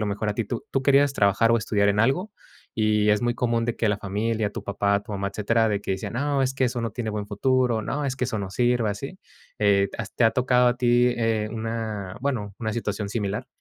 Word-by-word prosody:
lo 105 - -1
mejor, 105 +1 -2
a 105 - -1
ti 115 - -1
tú 115 +3 -5
tú 135 - 0
querías 140 0 +4
trabajar 105 +2 +3
o 115 - +5
estudiar 105 -2 +1
en 100 +1 +1
algo, 135 - +1 0.4
y 105 -1 +2
es 105 +2 +2
muy 120 0 +1
común, 115 -1 0
de 120 0 -1
que 115 - +1
la 105 - +1
familia 105 +2 -1
tu - - -6
papá, 100 0 0
tu 105 - -9
mamá, 100 0 -2
etcétera, 110 +3 +1
de 100 -1 -1
que 95 - -2
decían: 95 - -4
"No, 140 +2 0
es 130 0 0
que, 135 -1 0
eso 120 -1 -1
no 115 - -2
tiene 110 +1 -4
buen 105 -1 -4
futuro. 125 +2 +1
No, 145 +5 -3
es 135 -1 -2
que 125 - -1
eso, 115 -3 -2
no 100 -2 -4
sirve", 120 -1 +1
¿así? 135 - -6 0.4
Eh, 100 -1 +3
¿has 110 -1 -6
te 120 - +2
ha 115 - +6
tocado 125 -1 +3
a 120 - 0
ti, 120 0 +3
eh, 110 -2 0
una 110 -4 -4
bueno, 115 -8 -2
una 110 -2 -2
situación 105 -3 -3
similar? 105 -2 -3
115 Hz, 245 wpm, -25 LUFS, 105-125 Hz, 0.4 s, ha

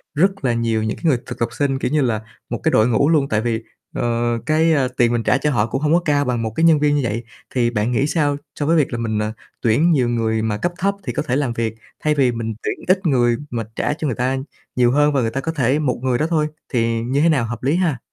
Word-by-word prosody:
rất 190 -1 +1
là 120 - +2
nhiều 115 -1 0
những 110 - -2
cái - - -16
người 145 -6 +4
thực - - -7
tập 115 - 0
sinh, 135 -2 -1
kiểu - - -2
như 155 0 +2
là, 115 -5 0 0.3
một - - -3
cái - - +2
đội 110 +2 +4
ngũ 125 +5 +2
luôn? 145 -4 +2
Tại 110 0 +1
vì, 115 -1 -2 0.3
ờ, 120 0 0
cái, 160 +1 +3
ờ, 135 -4 +2
tiền 120 -1 +3
mình 115 - 0
trả 125 - +3
cho 150 +2 0
họ 120 -6 +2
cũng 135 +3 -3
hông 155 +1 +2
có 175 - +4
cao 145 -1 +2
bằng 120 -2 -1
một 110 - -2
cái 165 - 0
nhân 160 -3 +6
viên 145 0 +2
như 145 - +1
vậy. 115 0 -2 0.3
Thì 120 -2 +2
bạn 115 0 -1
nghĩ 135 +4 +1
sao 145 -3 +1 0.2
so 145 - 0
với 165 +2 +3
việc 145 - +2
là - - -1
mình, 110 -2 -1
à, 105 +1 -2 0.3
tuyển 140 +10 +3
nhiều 125 -6 +2
người 110 -2 0
mà 110 -2 -1
cấp 175 - -1
thấp 200 +2 0
thì - - -4
có - - -1
thể 130 -4 -1
làm 135 -4 0
việc, 115 -1 -2 0.3
thay 150 0 +2
vì 135 -4 +3
mình 115 -1 -3
tuyển - - -4
ít 185 +1 +2
người 120 -6 +3
mà 115 -2 -3
trả - - 0
cho 155 0 -3
người 125 - -1
ta 130 +2 0 0.4
nhiều 120 -1 +3
hơn 145 +1 +3
và 135 - +2
người 115 -1 -1
ta 135 - -2
có 160 - -2
thể 140 -2 +1
một 135 -6 -1
người 130 -1 +1
đó 155 +4 0
thôi, 155 -3 +1 0.3
thì 115 -1 +1
như 130 +5 0
thế 165 - +4
nào 140 -7 +2
hợp 120 +2 -6
lý 140 +4 +2
ha? 175 -7 +1
130 Hz, 290 wpm, -20 LUFS, 115-150 Hz, 0.4 s, nhân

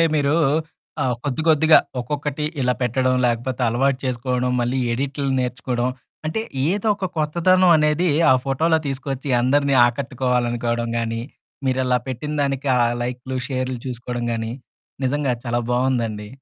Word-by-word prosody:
అంటే, 165 - +6
మీరూ 145 0 +2 0.7
ఆహ్, 125 -2 +1
కొద్ది 145 +2 -1
కొద్దిగా 155 0 +6 0.2
ఒక్కొక్కటి 145 +2 -3 0.2
ఇలా 125 0 +2
పెట్టడం, 130 +1 +1
లేకపోతే 120 +2 -2
అలవాటు 130 +3 +1
చేసుకోడం, 125 0 -1
మళ్ళీ 125 +2 0
ఎడిట్లు 140 +3 -2
నేర్చుకోడం, 125 0 -1 0.4
అంటే, 190 +8 -1 0.3
ఏదొక 205 0 0
కొత్తదనం 175 +4 +3
అనేదీ 150 +3 +2 0.2
ఆ - - +8
ఫోటోలో 160 +4 +2
తీసుకొచ్చి, 135 0 -4
అందరిని 140 +2 +2
ఆకట్టుకోవాలనుకోడం 120 -2 -1
గానీ, 115 0 -2 0.5
మీరలా 130 -1 +2
పెట్టిన 130 +4 -4
దానికి 140 0 -1
ఆ - - +2 0.2
లైక్లు, 125 +1 -4
షేర్లు 130 -1 -2
చూసుకోడం 120 -1 -4
గానీ, 115 0 -3 0.5
నిజంగా 140 0 +1
చాలా 120 0 0
బావుందండి. 120 -4 0
130 Hz, 130 wpm, -22 LUFS, 120-145 Hz, 0.7 s, ఆ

